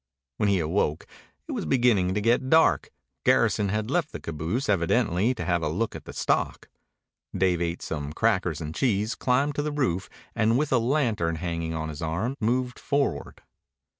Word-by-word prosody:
When 105 - +2
he 100 - +3
awoke 80 -2 0 0.4
it - - -5
was - - -3
beginning 110 -8 +3
to 105 - 0
get 120 +4 +2
dark. 160 +2 +4 0.3
Garrison 100 -1 +3
had 105 +4 -2
left 170 -2 0
the - - -6
caboose, 85 - -3
evidently 105 +4 +2
to 85 - -5
have 85 -1 +1
a 80 - -1
look 105 +9 -2
at - - -9
the - - -8
stock. - - -1 0.7
Dave 90 -2 +2
ate 85 0 -2
some 75 -2 -4
crackers 90 -5 0
and 80 0 -5
cheese, 105 0 0
climbed 135 +3 +1
to 145 - -1
the 150 +1 -2
roof, 125 - -1 0.2
and 115 +2 +2
with 150 +1 0
a 130 - +4
lantern 115 - +1
hanging 85 -1 -3
on 80 0 -3
his 75 +1 -7
arm 90 +11 -2
moved 125 +2 0
forward. 140 - -2
105 Hz, 180 wpm, -26 LUFS, 85-125 Hz, 0.7 s, dark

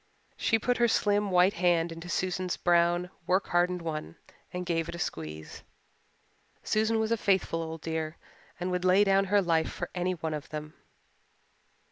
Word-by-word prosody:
She 225 - +2
put 245 +2 0
her 240 0 +4
slim 205 -2 +2
white 180 +1 +4
hand 175 -3 +2
into 165 +1 -8
Susan's 185 +1 -1
brown, 175 +1 +2 0.2
work 185 +2 +1
hardened 175 0 +1
one 155 - -4 0.4
and 180 0 -4
gave 165 -1 -1
it 170 - -5
a - - -6
squeeze. 80 - -5 1.0
Susan 220 +1 +1
was 220 0 0
a 230 - +3
faithful 190 -5 +1
old 160 -1 -6
dear 160 0 -3 0.4
and 180 +1 -2
would 180 0 -1
lay 185 +2 +5
down 195 -1 +3
her 200 +1 +3
life 165 -2 +1
for 175 - -5
any 180 0 0
one 160 -2 -4
of 150 0 -6
them. 155 0 -6
175 Hz, 170 wpm, -29 LUFS, 165-195 Hz, 1.0 s, lay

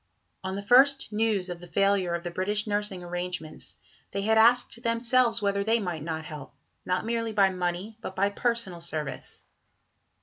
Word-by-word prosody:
On 190 0 -3
the 200 - -5
first 260 +1 +4
news 210 -3 +1
of 175 -1 -6
the 175 - -11
failure 195 -2 +1
of 170 - -5
the 175 - -4
British 205 +4 -1
nursing 205 -3 -2
arrangements, 175 -2 -5 0.3
they 200 - -3
had 220 +2 +3
asked 235 +1 +4
themselves 230 -1 +2
whether 200 0 +1
they 225 +3 +2
might 175 -7 -3
not 160 0 -4
help, 150 -1 -9 0.3
not 180 +3 -1
merely 230 -1 -1
by 195 -2 +4
money, 180 +4 -3
but 190 - -6
by 200 +1 +2
personal 215 -6 -2
service. 155 -4 -4
200 Hz, 170 wpm, -27 LUFS, 175-225 Hz, 0.3 s, first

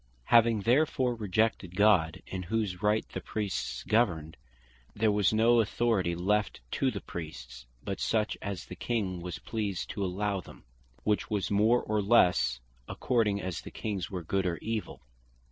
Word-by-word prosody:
Having 115 -2 +6
therefore 130 +2 +2
rejected 105 -3 0
God, 95 -6 +3
in 95 - -5
whose 100 -1 -2
Right 105 +1 +1
the - - -5
Priests 105 -4 -3
governed, 85 -9 +1 0.6
there 110 0 +2
was 105 -2 +3
no 115 +2 +4
authority 110 -5 +1
left 105 +4 0
to - - +1
the - - -5
Priests, 80 -7 -8 0.2
but 95 -1 -4
such 110 -1 0
as 100 -3 -5
the 90 - -9
King 95 -4 -2
was 90 0 -5
pleased 105 -5 -3
to 100 - -3
allow 100 +1 -1
them; - - -14 0.4
which 105 -1 0
was 105 -2 -1
more, 110 +4 +3
or 105 0 0
lesse, 90 - +3 0.3
according 105 -5 0
as 95 -3 -4
the - - -9
Kings 100 -5 -4
were 90 -3 -5
good, 95 +3 0
or 85 -1 -1
evill. 110 - -4
105 Hz, 160 wpm, -30 LUFS, 90-110 Hz, 0.6 s, Having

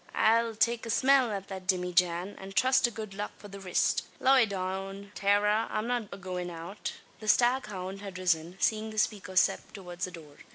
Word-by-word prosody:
I'll 230 0 +3
take 230 +1 +1
a - - -6
smell 265 +2 +4
at 200 -2 -4
the 190 -1 -5
dimmyjan, 180 0 +1
an 195 0 -8
trust 255 +4 +4
to - - +2
good 220 -3 -7
luck 205 +1 -5
for 205 - -12
the 200 0 -9
rist. 185 -2 +1 0.2
Loy 260 -3 +5
down, 195 +1 -4
Tara, 210 +2 +2
I'm 215 +1 -2
not 240 -4 -2
agoin' 180 -2 -5
out." 170 +4 -6 0.3
The 215 - -9
staghound 210 -6 +1
had 195 -3 -7
risen, 175 -1 0
seeing 220 0 +1
the 215 - -9
speaker 200 -3 -1
step 185 - +2
towards 180 -3 -5
the - - -7
door. 155 -4 -12
200 Hz, 190 wpm, -29 LUFS, 185-220 Hz, 0.3 s, Loy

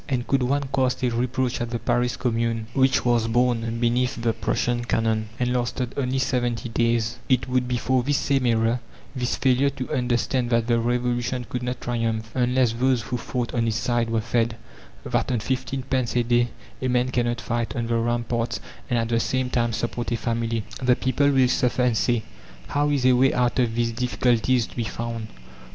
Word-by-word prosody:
And 125 -3 -1
could 135 -1 +1
one 140 +2 0
cast 130 -2 +1
a 125 - +2
reproach 125 +1 -1
at 120 - -2
the 120 - -2
Paris 120 +2 0
Commune, 115 -2 -1
which 130 -1 +3
was 120 -2 +2
born 115 -1 +1
beneath 120 +1 +1
the 115 -1 +1
Prussian 120 +1 -1
cannon, 110 -2 0
and 125 0 +1
lasted 125 0 -2
only 130 -1 -1
seventy 120 -3 -1
days, 115 -1 0
it 130 -1 +2
would 125 -1 +1
be 125 0 0
for 130 +1 +1
this 140 +3 +1
same 135 -3 +1
error 115 +1 +2 0.4
this 125 -1 -1
failure 130 +1 +3
to 130 -2 -5
understand 125 0 0
that 115 -1 +2
the 120 0 +2
Revolution 120 +1 -1
could 125 - -4
not 125 0 -3
triumph 115 -2 -2
unless 125 -1 +2
those 125 0 +1
who 125 - -3
fought 120 0 -3
on 115 -2 +1
its 115 0 0
side 120 -2 0
were 115 -1 +1
fed: 115 +1 0 0.5
that - - -1
on 120 - +1
fifteen 130 +3 -2
pence 130 -2 -1
a 120 - +3
day 120 0 +2 0.3
a 130 - 0
man 125 0 +2
cannot 120 -1 0
fight 120 +2 -2
on 120 -2 -1
the 115 0 0
ramparts 120 0 -1 0.3
and 120 - +1
at 115 0 0
the 115 -1 +2
same 130 +1 -1
time 120 -1 +1
support 120 +1 -3
a 115 - +1
family. 115 0 -1 0.2
The 125 -1 +4
people 130 +3 +1
will 135 -2 +4
suffer 125 0 +1
and 125 -2 +2
say: 115 +1 +1 0.5
"How 145 +1 +1
is 140 -3 +1
a 130 - +6
way 130 +2 +3
out 125 +1 +1
of 115 -3 +1
these 120 0 +1
difficulties 125 0 +1
to - - -15
be 120 - -1
found?" 115 0 -4
120 Hz, 200 wpm, -24 LUFS, 115-125 Hz, 0.5 s, a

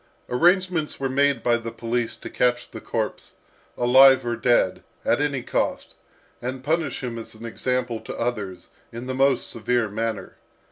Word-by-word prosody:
Arrangements 175 +3 +2
were 135 -1 -1
made 140 -2 +2
by 120 -1 +3
the 115 0 -6
police 115 0 -2
to - - -10
catch 120 -1 0
the - - -8
corpse, - - -3 0.4
alive 130 +2 +6
or 120 0 -1
dead, 120 -6 +2 0.2
at - - +2
any 140 -4 -1
cost, - - -2 0.5
and 130 +1 -4
punish 155 -2 -1
him 120 -2 -4
as 115 - -8
an 110 +2 -10
example 125 0 -2
to - - -8
others, 105 -6 -3 0.2
in 115 +2 -7
the 130 - -3
most 135 0 +2
severe 115 0 0
manner. 110 +1 -4
125 Hz, 160 wpm, -24 LUFS, 115-135 Hz, 0.5 s, alive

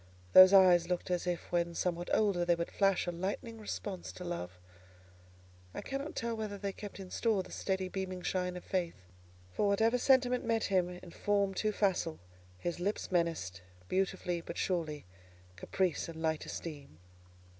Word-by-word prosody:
Those 185 0 +11
eyes 180 -3 +7
looked 180 0 -2
as 180 0 -1
if 175 -1 -3
when 170 -1 0
somewhat 175 0 -1
older 200 -5 +2
they 175 0 +3
would 170 0 -4
flash 195 -2 +2
a 175 - -1
lightning 200 +6 -4
response 205 -3 -5
to 180 - -8
love: 95 - -5 1.2
I - - -3
cannot 275 +3 -5
tell 230 0 -2
whether 215 -2 -4
they 200 0 -3
kept 205 0 -9
in 190 -1 -9
store 220 -5 +1
the - - -14
steady 190 -1 -1
beaming 185 -1 -4
shine 180 -1 -1
of 180 - -9
faith. 180 -3 -1 0.6
For 205 - +1
whatever 225 +5 +3
sentiment 250 -1 +3
met 225 -1 +1
him 185 -3 +2
in 180 -1 -10
form 200 0 +1
too 215 +2 0
facile, 195 - 0 0.4
his 175 - -3
lips 200 +3 -2
menaced, 165 - 0 0.3
beautifully 185 -2 -1
but 170 - -7
surely, 160 - -2 0.5
caprice 170 - -1
and 160 -1 -8
light 160 -1 -1
esteem. 145 - -7
185 Hz, 165 wpm, -33 LUFS, 175-200 Hz, 1.2 s, Those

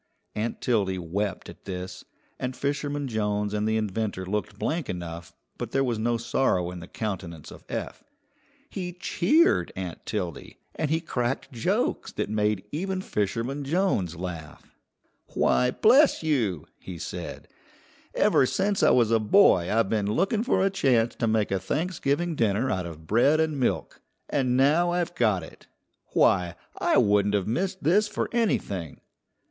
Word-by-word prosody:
Aunt 110 +2 -3
Tildy 100 -6 +1
wept 95 +3 -3
at - - -13
this, 90 -1 -6 0.4
and 125 0 -3
Fisherman 145 +1 -2
Jones 105 -2 -1
and 105 0 0
the 110 0 +1
inventor 105 -2 -2
looked 105 +1 -3
blank 160 -1 -2
enough, 85 -1 -6 0.3
but - - -5
there 135 - +3
was 120 -4 -1
no 120 +1 +1
sorrow 115 -7 0
in 90 - -7
the 85 - -10
countenance 90 -8 -5
of - - -12
Eph. - - -5 0.6
He 180 -3 -5
cheered 305 - +2
Aunt 90 -3 -6
Tildy, 90 -7 -4 0.2
and 155 - -2
he 160 +2 +1
cracked 125 -5 -2
jokes 115 -3 -1
that - - -3
made 105 -2 0
even 190 +4 -2
Fisherman 115 - -2
Jones 140 - 0
laugh. 85 -3 -8 0.6
"Why, 125 - +3
bless 255 - +4
you!" 115 - 0
he 90 -2 -8
said, - - -6 0.7
"ever 130 - +4
since 195 +5 0
I - - +6
was 115 -3 +4
a 115 - +4
boy 105 - +4
I've 110 -2 +2
been 105 -2 0
looking 195 - +1
for 230 -5 +2
a 195 - +2
chance 125 -10 +2
to 115 - -1
make 110 -2 +1
a 95 - +1
Thanksgiving 160 - -1
dinner 115 +1 +1
out 90 -2 -2
of 80 -1 -10
bread 120 - +3
and 155 -3 0
milk. 125 - -1 0.3
And 130 -3 +1
now 155 +6 +4
I've 175 -1 -1
got 110 - +1
it. - - -14 0.5
Why, 90 -1 +3 0.2
I - - +3
wouldn't 100 0 +3
have 100 -3 0
missed 185 - -2
this 200 +8 +4
for 210 - -3
anything!" 100 - -1
115 Hz, 160 wpm, -26 LUFS, 95-155 Hz, 0.7 s, I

